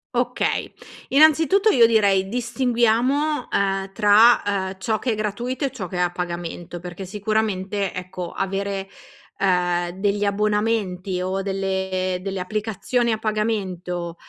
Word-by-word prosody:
Okay. - - -1 0.4
Innanzitutto, 315 +8 +5
io 235 - +6
direi: 200 -4 +3
distinguiamo, 245 +4 +1
uhm, 195 -1 0
tra, 215 +3 +6
uhm, 190 -2 -1
ciò 215 +2 -1
che 250 - -1
è - - 0
gratuito 240 +6 -2
e 270 - -2
ciò 205 -9 -6
che 180 - -6
è - - -2
a 175 -1 +1
pagamento 175 0 -5
perché, 180 +2 -8
sicuramente, 200 -1 -1
ecco, 180 -1 -6
avere, 195 0 -3 0.5
ehm, 175 -2 +1
degli 205 0 0
abbonamenti 200 -3 0
o 190 +1 -2
delle 190 -1 -1
delle 195 -1 -4
applicazioni 220 +4 -1
a 220 - -1
pagamento, 190 -6 -2
200 Hz, 130 wpm, -22 LUFS, 185-225 Hz, 0.5 s, io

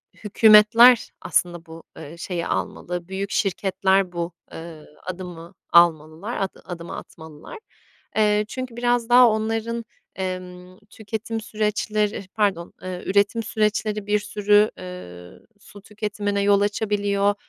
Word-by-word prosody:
hükûmetler 220 +3 +6
aslında 175 -2 -1
bu, 165 0 -12
ııı, 160 +1 -10
şeyi 170 0 -4
almalı, 175 -1 -4
büyük 195 +1 -4
şirketler 190 -1 +1
bu, 170 0 -4 0.2
ııı, 165 -2 -10 0.2
adımı 180 -1 -8 0.2
almalılar, 170 +5 +3
ad 195 - -3
adımı 170 -2 -7
atmalılar. 160 - -11 0.6
Eee, 210 0 +3
çünkü 255 0 -6
biraz 240 -1 0
daha 245 0 +8
onların, 225 +1 -2 0.3
emm, 185 -1 -6
tüketim 220 +1 -5
süreçleri 210 -1 -2
Pardon, 195 -6 0
eee, 185 -1 -6
üretim 205 +4 +1
süreçleri 215 -1 -1
bir 210 0 +2
sürü, 210 0 +2
ııı, 90 - -10
su 205 0 -15
tüketimine 205 -1 -3
yol 200 0 +3
açabiliyor, 205 -1 0
200 Hz, 115 wpm, -23 LUFS, 180-215 Hz, 0.6 s, daha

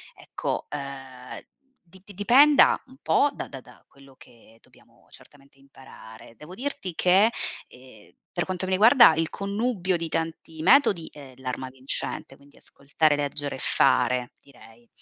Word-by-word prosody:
ecco, - - -5
ehm, 135 -3 -9 0.4
di 180 +2 -19
di 205 - -13
dipenda 255 +9 +5
un 260 - -18
po' 290 - +2
da - - -7
da 135 - -9
da - - -19
quello 135 -1 -20
che 115 -2 -20
dobbiamo - - -25
certamente 140 -1 -18
imparare. 130 -4 -16
Devo 175 +5 -12
dirti 235 -8 -5
che, 195 +7 +3 0.4
ehm, 125 -5 -18 0.2
per 175 - -3
quanto 185 0 -3
mi 185 - -4
riguarda 225 - +6
il 165 +1 -1
connubio 200 -3 -2
di 165 - -5
tanti 160 0 -5
metodi 180 - +3
è 140 -3 -13
l'arma 130 0 -6
vincente, 130 +1 -5
quindi 140 +1 -22
ascoltare, 145 +2 -1
leggere 145 0 -3
e - - -10
fare 125 -1 +1
direi. 120 -3 -19
145 Hz, 150 wpm, -25 LUFS, 130-185 Hz, 0.4 s, riguarda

